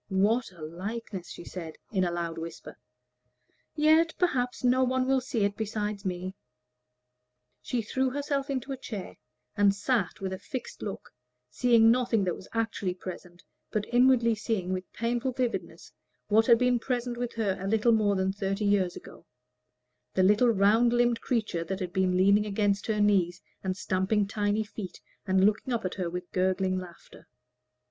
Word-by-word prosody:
"What 210 +4 +2
a 170 -4 -12
likeness!" 190 +3 -6
she - - -9
said, 165 -4 -7 0.2
in 190 -4 +1
a 180 - +1
loud 170 -1 -3
whisper; 165 +1 -8 1.0
"yet, 315 +2 +4
perhaps, 255 -10 0
no 255 +1 +4
one 255 0 +1
will 265 0 +2
see 240 -4 -1
it 200 0 -1
besides 210 -2 -3
me." 185 0 -3 1.3
She 240 -2 -2
threw 260 +5 0
herself 280 +1 -2
into 270 0 -3
a 270 - -3
chair, 210 -7 -7 0.4
and 200 -1 +4
sat 205 -2 0
with 190 -1 -3
a 190 - -5
fixed 255 +5 -7
look, 200 - -6 0.4
seeing 230 - +5
nothing 235 -4 +2
that 180 -2 0
was - - -12
actually 220 -5 -1
present, 180 -1 -9 0.3
but 210 -1 -1
inwardly 245 -2 +5
seeing 205 -4 -2
with 185 0 -5
painful 240 +2 -1
vividness 245 -2 -3 0.4
what 220 +2 +4
had 235 -2 +7
been 250 0 +2
present 245 0 -2
with 240 0 -4
her 210 -4 0
a 195 - -4
little 220 +3 +3
more 210 -3 +3
than 190 0 0
thirty 195 +1 -2
years 195 -3 +2
ago - - -12 0.9
the 185 - +4
little 210 +6 +5
round 225 +3 +4
limbed 240 -1 +2
creature 215 -9 -1
that 190 +3 -3
had 180 -2 -4
been 185 -2 +2
leaning 200 +3 +4
against 200 -1 0
her 215 -2 0
knees, 190 -4 +2 0.2
and 185 -1 -2
stamping 200 +2 +1
tiny 205 +1 0
feet, 205 -3 -8 0.3
and 190 0 +4
looking 215 +5 +1
up 230 -4 -1
at 185 - -2
her 180 -3 -3
with 180 +1 -6
gurgling 185 0 +1
laughter. 175 -2 -13
210 Hz, 170 wpm, -28 LUFS, 190-240 Hz, 1.3 s, had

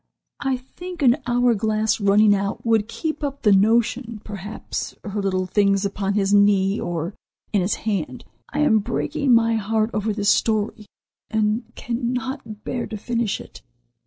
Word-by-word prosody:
I 265 -2 0
think 350 +6 -8
an 250 0 +5
hour 245 0 +3
glass 215 +1 0
running 205 +1 +5
out 200 +2 -2
would 225 -2 +2
keep 310 +5 -4
up 280 -1 -4
the 210 - +5
notion; 225 +3 +2
perhaps 205 +1 -6
her 205 -1 -3
little 185 -1 0
things 200 +1 +2
upon 200 0 -1
his 200 -1 +1
knee 200 0 +4
or 170 +2 -3 0.4
in 205 - +3
his 185 +3 0
hand. 180 - -2 0.2
I 295 - -1
am 220 -7 +4
breaking 285 +6 -1
my 230 0 +3
heart 220 +1 0
over 215 +1 0
this 205 -1 0
story, 215 0 +1 0.4
and 220 +2 0
cannot 245 -2 -4
bear 245 - -3
to 215 - -5
finish 230 -1 -1
it." - - -12
215 Hz, 160 wpm, -22 LUFS, 200-235 Hz, 0.4 s, an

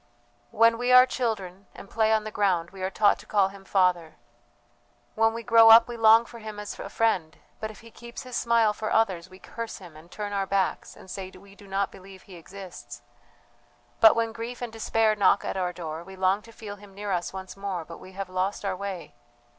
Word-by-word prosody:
"When 230 - +3
we 245 +1 0
are 250 0 +9
children 200 -7 -4
and - - -11
play 220 +1 +1
on 220 -1 +2
the 215 - -6
ground 185 -5 0
we 190 -1 -11
are 185 - -1
taught 205 +1 +3
to - - -14
call 200 -2 +2
Him 195 0 -13
Father! 180 -4 +1 1.0
When 225 0 +3
we 230 +1 -6
grow 230 -1 +7
up 230 +1 +9
we 240 - -6
long 225 0 +6
for 235 - -12
Him 215 -1 -8
as 210 - -7
a - - -6
friend, 180 -9 0 0.2
but 215 - -4
if 215 - -13
He 230 0 -15
keeps 235 +1 -10
His 255 -2 -8
smile 230 -2 +2
for 215 0 -4
others 190 -7 +1
we 185 - -14
curse 230 +3 -7
Him 175 -5 -13
and 160 +2 -15
turn 205 +1 -6
our 195 -1 -1
backs 195 -1 -1
and - - -15
say 190 0 -6
we 195 +1 -16
do 200 0 -16
not 195 0 -1
believe 190 0 -14
He 190 - -13
exists. 165 -10 -11 1.0
But 220 - +7
when 230 -1 0
grief 230 +2 -7
and 240 -2 -6
despair 225 -1 +1
knock 200 -3 +3
at - - -3
our 180 -2 -1
door, 165 -2 -7
we 190 +2 -12
long 190 +2 +1
to 230 - -15
feel 210 -2 -9
Him 200 -1 -16
near 205 0 -5
us 175 -2 -1
once 190 0 -8
more, 195 -4 -4
but 165 - -11
we 185 - -13
have 195 0 -5
lost 185 +2 -2
our 195 -1 -1
way. 195 -2 -6
200 Hz, 225 wpm, -26 LUFS, 185-225 Hz, 1.0 s, are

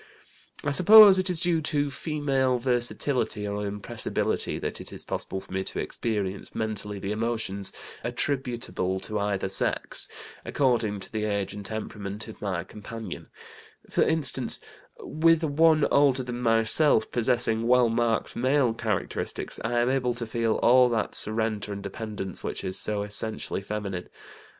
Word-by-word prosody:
"I 145 - 0
suppose 200 +4 +9
it 185 +1 -1
is 175 -3 +1
due 170 -2 +1
to 145 -2 0
female 140 -3 0
versatility 120 -3 0
or 105 0 -3
impressibility 100 0 -2
that - - -4
it - - -10
is - - -4
possible 95 - -4
for - - -17
me 95 0 -1
to - - -5
experience 100 -4 -3
mentally 105 -2 -3
the 100 +1 -4
emotions 110 -3 -2 0.3
attributable 120 -8 -2
to 105 -1 -3
either 100 -1 -1
sex, 95 - 0 0.4
according 115 -7 0
to - - -3
the 110 -1 -2
age 100 -2 -2
and 105 0 -7
temperament 105 0 -6
of 110 - -11
my 95 -4 -2
companion; 110 +3 -8 0.6
for - - +1
instance, 140 -6 +1 0.4
with 165 +1 +2
one 155 0 +4
older 135 -2 +4
than 125 0 -5
myself, 115 +2 +3
possessing 115 -1 +1
well 125 0 +5
marked 115 -1 0
male 130 -1 +2
characteristics, - - -3
I 115 +2 -2
am 120 - +2
able 125 -2 0
to 120 -1 -4
feel 115 0 0
all 125 +1 +6
that 115 -2 -1
surrender 110 -1 +1
and 100 0 -7
dependence 100 -1 -5
which - - -4
is 95 - -3
so 105 -1 0
essentially 105 0 -1
feminine. 100 -3 -5
115 Hz, 150 wpm, -26 LUFS, 105-130 Hz, 0.6 s, suppose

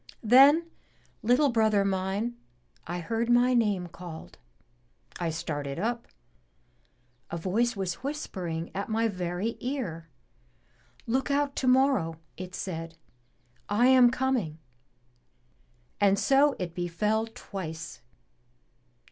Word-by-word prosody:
Then, 275 +8 +7 0.6
little 250 +6 +3
brother 220 -4 +3
mine, 195 +5 -1 0.5
I 175 +1 -3
heard 230 +6 -2
my 245 +1 +4
name 205 -7 +2
called. 170 - -10 0.8
I 170 - -1
started 145 -4 -4
up. 235 +5 -2 1.2
A 170 - -4
voice 220 +8 0
was 190 -3 -2
whispering 185 - -4
at 200 +3 -4
my 225 +1 +1
very 185 +3 -3
ear. 220 - -4 1.0
'Look 260 +5 0
out 280 0 +1
tomorrow,' 255 - +2 0.2
it 180 0 -7
said, 165 -3 -5 0.7
*I 235 +5 +4
am 255 -2 +7
coming.' 250 -11 -1 1.4
And 200 -1 +4
so 275 +6 +4
it 175 -3 -4
befell 210 +6 -1
twice. 160 -8 -7
210 Hz, 105 wpm, -28 LUFS, 175-245 Hz, 1.4 s, Then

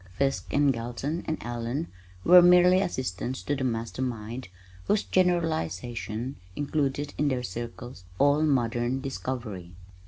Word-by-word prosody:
Fiske 135 +3 -1
and 140 -1 +3
Galton 120 +8 -4
and 155 - -1
Allen 120 +6 -3 0.4
were 180 +1 +9
merely 180 +1 +6
assistants 130 - -3
to 145 - 0
the 135 - -3
Master 115 0 -2
Mind 120 -1 -4 0.4
whose 210 - +2
generalizations 130 - -1 0.2
included 145 0 -1
in 150 - +2
their 130 -3 0
circles 120 0 -7
all 145 +2 +4
modern 125 -3 +1
discovery. 120 -10 -5
130 Hz, 125 wpm, -27 LUFS, 120-150 Hz, 0.4 s, were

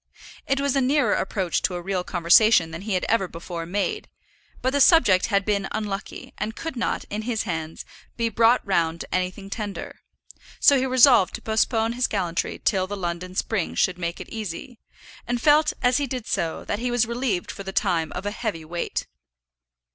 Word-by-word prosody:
It 275 0 +1
was 280 -1 0
a 275 - +3
nearer 265 -4 +2
approach 185 -4 -1
to 180 - -1
a 175 - -4
real 190 -1 -2
conversation 175 0 +4
than 160 +2 -7
he 205 -1 -2
had 180 - -1
ever 225 -5 +2
before 170 0 -7
made; 205 - -2 0.5
but 260 - +2
the 285 - +2
subject 240 - +5
had 200 -2 +1
been 200 -2 0
unlucky, 205 -2 -5
and 215 +2 -3
could 325 -4 -5
not, 235 - -1
in 210 +1 -2
his 225 0 -2
hands, 160 -1 -5 0.3
be 230 -1 +1
brought 230 +2 +3
round 170 -4 0
to - - -8
anything 185 +2 -2
tender; 205 -2 -6 0.6
so 285 - +6
he 265 0 +1
resolved 255 -6 +5
to - - -8
postpone 225 +1 +1
his 250 +1 +1
gallantry 175 -5 -2
till 190 -3 +2
the 205 +1 -5
London 180 0 -4
spring 200 -3 -1
should 180 -1 +1
make 170 0 -3
it - - -9
easy, 220 +2 -6 0.5
and 245 0 -1
felt 300 +3 +4
as 245 0 +4
he 285 -1 -1
did 250 -3 -5
so, 165 -1 -2
that 205 - -2
he 245 +1 -1
was 240 -1 +2
relieved 235 -5 -2
for - - -9
the 195 -1 -6
time 175 -6 0
from - - -6
a 205 - -1
heavy 205 -8 -4
weight. 170 +2 -3
205 Hz, 195 wpm, -24 LUFS, 180-240 Hz, 0.6 s, so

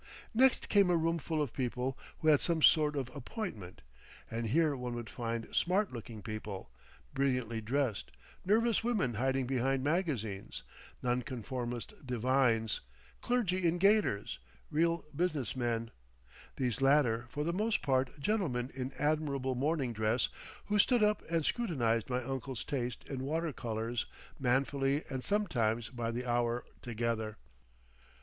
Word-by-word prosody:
Next 260 +3 +4
came 200 -3 +5
a 175 - +4
room 165 +1 +1
full 155 0 -1
of 135 - -5
people 130 0 -1 0.2
who 155 - +2
had 150 -2 +6
some 165 -3 +1
sort 150 -2 +6
of 130 -2 -3
appointment, 130 - -6 0.5
and 115 0 -2
here 155 +4 +3
one 125 -2 -4
would 120 -2 -6
find 115 -1 -4
smart 185 -1 +2
looking 115 -3 -7
people, 105 -3 -6 0.4
brilliantly 125 -5 0
dressed, 125 0 -1 0.3
nervous 225 +3 +3
women 215 - +1
hiding 130 +3 +1
behind 130 +1 +1
magazines, 135 - -1 0.4
nonconformist 125 -1 -2
divines, 125 -3 +2 0.4
clergy 185 -8 +1
in 165 +1 +2
gaiters, 195 - +2 0.3
real 165 +2 +2
business 155 -7 0
men, 115 -2 -1 0.6
these 125 -2 -1
latter 130 -4 +4
for 145 - -2
the 170 +2 0
most 215 +4 0
part 135 +1 +1
gentlemen 140 - 0
in 130 0 -4
admirable 145 -3 0
morning 135 -1 0
dress 110 +2 +1 0.4
who 210 0 +1
stood 240 +1 +5
up 210 -1 +3
and 165 -2 +1
scrutinised 120 - +1
my 125 0 0
uncle's 135 0 -4
taste 125 -5 -3
in 135 -2 -4
water 160 +2 -1
colours 115 0 -2 0.3
manfully 135 +2 +1
and 130 -1 -3
sometimes 120 - +1
by 120 -2 -3
the 120 +2 -3
hour 120 0 +1 0.2
together. 115 -2 -2
130 Hz, 140 wpm, -33 LUFS, 120-160 Hz, 0.6 s, had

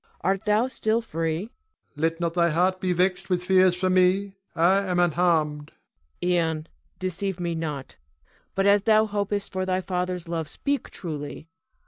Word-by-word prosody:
Art 190 +2 0
thou 210 +3 +3
still 230 -3 0
free? 165 -7 -2
Ion. 215 - -8 0.5
Let 165 +2 0
not 170 -1 -1
thy 170 -1 +3
heart 185 +3 +1
be 185 - 0
vexed 180 +2 0
with 180 -1 0
fears 185 -1 +5
for 185 +1 0
me, 185 +2 +3 0.2
I 175 +4 +4
am 185 -3 -1
unharmed. 160 -4 +1 0.5
Cleon. 180 0 +1 0.2
Ion, 155 +1 -8 0.3
deceive 185 0 -3
me 170 -1 -1
not, 150 -5 -5 0.6
but 195 - +1
as 200 0 +5
thou 215 +1 +4
hopest 205 -1 -2
for 185 -1 -2
thy 185 0 0
father's 180 -1 -3
love, 165 -2 -3
speak 280 - -2
truly. 155 -1 -7
180 Hz, 165 wpm, -25 LUFS, 165-195 Hz, 0.6 s, fears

